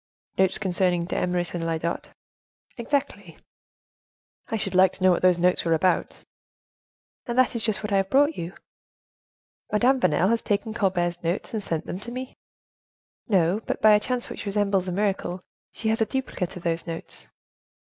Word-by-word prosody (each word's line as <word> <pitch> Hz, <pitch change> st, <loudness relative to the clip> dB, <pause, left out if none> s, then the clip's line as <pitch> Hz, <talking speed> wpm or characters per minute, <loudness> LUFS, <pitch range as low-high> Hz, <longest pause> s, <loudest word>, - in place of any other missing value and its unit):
"Notes 190 Hz, 0 st, +2 dB
concerning 180 Hz, -3 st, 0 dB
d'Eymeris 180 Hz, 0 st, -1 dB
and 175 Hz, -1 st, -3 dB
Lyodot?" 165 Hz, 0 st, -2 dB, 0.7 s
"Exactly." 235 Hz, -, -3 dB, 1.1 s
"I 225 Hz, -, -2 dB
should 195 Hz, -3 st, -3 dB
like 185 Hz, 0 st, +5 dB
to 185 Hz, -, -7 dB
know 185 Hz, -, +6 dB
what 175 Hz, -, +1 dB
those 180 Hz, -1 st, +4 dB
notes 180 Hz, +1 st, +2 dB
were 165 Hz, -1 st, +2 dB
about." 175 Hz, +2 st, 0 dB, 1.0 s
"And 240 Hz, 0 st, -3 dB
that 255 Hz, -1 st, +3 dB
is 230 Hz, -, -1 dB
just 220 Hz, -1 st, -1 dB
what 210 Hz, -, -3 dB
I -, -, +4 dB
have 195 Hz, 0 st, 0 dB
brought 290 Hz, +6 st, +4 dB
you." 170 Hz, +2 st, -5 dB, 1.2 s
"Madame 250 Hz, +5 st, +3 dB
Vanel 180 Hz, -2 st, +2 dB
has 230 Hz, -1 st, +1 dB
taken 210 Hz, +1 st, -1 dB
Colbert's 175 Hz, -5 st, 0 dB
notes 170 Hz, +7 st, -2 dB
and 220 Hz, -, -1 dB
sent 165 Hz, -5 st, -3 dB
them 180 Hz, -, -5 dB
to 235 Hz, +4 st, -7 dB
me?" 255 Hz, +1 st, -6 dB, 0.9 s
"No; 190 Hz, -1 st, +2 dB
but -, -, -2 dB
by 215 Hz, -, +6 dB
a 210 Hz, -, +6 dB
chance 245 Hz, +3 st, -2 dB
which -, -, -7 dB
resembles 200 Hz, -2 st, +1 dB
a -, -, -1 dB
miracle, 190 Hz, -2 st, -1 dB, 0.3 s
she 220 Hz, -, -3 dB
has 225 Hz, +1 st, 0 dB
a -, -, +4 dB
duplicate 235 Hz, -10 st, -3 dB
of 175 Hz, -, -10 dB
those 165 Hz, 0 st, -1 dB
notes." 165 Hz, 0 st, -6 dB
190 Hz, 175 wpm, -25 LUFS, 175-220 Hz, 1.2 s, know